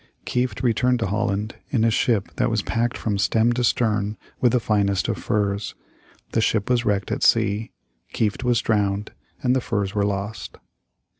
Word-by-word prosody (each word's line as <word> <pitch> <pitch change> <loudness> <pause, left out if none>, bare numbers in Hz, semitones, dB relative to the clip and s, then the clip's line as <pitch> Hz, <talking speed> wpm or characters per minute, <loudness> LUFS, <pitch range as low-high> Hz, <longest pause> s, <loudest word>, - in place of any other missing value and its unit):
Kieft 125 +1 -1
returned 125 +1 +2
to - - +1
Holland 105 +1 -1
in 115 -5 +1
a 115 - +4
ship 110 -2 +1
that - - +2
was 110 -3 0
packed 120 0 -1
from 105 -3 -2
stem 115 +4 +3
to 125 +1 -1
stern 105 -3 +1 0.2
with 125 - +3
the 125 - +3
finest 100 -4 +1
of - - -1
furs. 100 -1 -1 0.6
The 115 - +1
ship 110 +1 +1
was 120 -1 +2
wrecked 100 -3 0
at - - -2
sea. 105 +2 +2 0.4
Kieft 110 +2 -1
was 120 -2 +2
drowned, 105 -1 0 0.3
and 125 0 +3
the 130 - +1
furs 100 -5 -2
were 105 - 0
lost. 100 +2 -3
110 Hz, 175 wpm, -23 LUFS, 100-120 Hz, 0.6 s, a